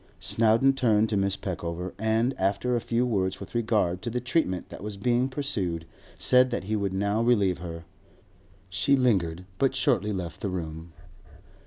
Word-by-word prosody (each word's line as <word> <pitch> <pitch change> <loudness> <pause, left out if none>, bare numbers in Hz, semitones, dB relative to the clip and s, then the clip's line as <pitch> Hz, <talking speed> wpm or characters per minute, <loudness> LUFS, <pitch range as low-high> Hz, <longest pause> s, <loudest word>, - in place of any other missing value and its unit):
Snowdon 115 +4 +3
turned 110 -5 +2
to 105 - 0
Mrs. 100 0 0
Peckover, 90 -1 -4
and, 110 +4 +1
after 100 +6 +1
a 120 - 0
few 120 +2 0
words 95 -6 0
with 100 - -9
regard 105 -6 +1
to 120 - -3
the 125 +2 -2
treatment 125 - -1
that - - -9
was 105 0 -6
being 120 +5 +1
pursued, 100 - -2 0.3
said 125 0 +5
that 120 - -3
he 105 +3 -2
would 100 -2 -1
now 100 +3 0
relieve 105 -7 +2
her; 85 -1 -7 0.8
she 95 +10 +2
lingered, 95 -10 +1
but 135 -1 +2
shortly 120 -6 +1
left 90 -4 -5
the 100 - -1
room. 80 -2 -5
105 Hz, 170 wpm, -27 LUFS, 95-120 Hz, 0.8 s, said